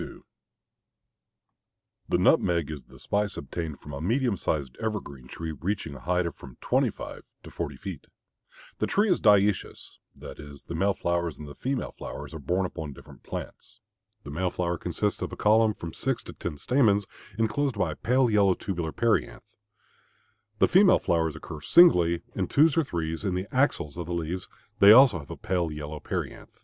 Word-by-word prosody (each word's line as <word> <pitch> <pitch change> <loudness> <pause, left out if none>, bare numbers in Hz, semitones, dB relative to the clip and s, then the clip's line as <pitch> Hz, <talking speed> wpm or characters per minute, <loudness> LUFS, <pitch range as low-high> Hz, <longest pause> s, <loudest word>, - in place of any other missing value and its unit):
_ - - -9 1.9
The - - +3
nutmeg 85 -4 +3
is 70 -5 -7
the - - -16
spice 105 -1 -1
obtained 75 +1 -5
from 75 - -10
a 70 - -5
medium 120 - +1
sized 70 -7 -2
evergreen 95 - -5
tree 80 +4 -6
reaching 85 0 -3
a 70 - -9
height 90 +1 0
of 85 - -3
from 65 -3 -13
twenty - - +2
five - - -8 0.2
to - - -11
forty 75 -5 -4
feet. 90 0 -8 0.7
This - - 0
tree 205 0 +3
is - - +2
dioecious, 105 -2 +2 0.2
that - - -10
is 70 -1 -11
the - - -7
male 95 +3 +1
flowers 85 -1 -1
and 75 - -9
the 70 - -9
female 130 - -3
flowers 75 +1 -8
are 80 - -6
borne 90 +7 0
upon 80 -5 -6
different - - -15
plants. - - -8 0.4
The 70 - -8
male 90 +5 -1
flower 85 -1 -2
consists - - -2
of - - -3
a - - -6
column 110 +1 +4
of 105 - -4
from 85 -1 -7
six 135 -3 -2
to - - -9
ten 80 -4 -5
stamens 105 - +2 0.3
enclosed 120 +3 0
by 90 -5 0
a - - -6
pale 125 - +2
yellow 100 -4 +3
tubular 85 -6 -3
perianth. 115 +3 0 1.1
The - - +4
female 190 +1 +6
flowers 80 -2 0
occur 80 -1 -8
singly, 85 - +5
in 95 -2 -2
twos 150 +1 +4
or 165 - +3
threes, 80 - -3
in 95 -3 -1
the 90 +1 -2
axils 125 - +1
of 85 -2 -5
the 85 - -3
leaves; 85 +2 -4 0.3
they 100 +2 +9
also 125 -8 +7
have 70 - -12
a - - -7
pale 90 -3 -1
yellow 75 0 -6
perianth. - - -5
90 Hz, 185 wpm, -27 LUFS, 80-105 Hz, 1.9 s, they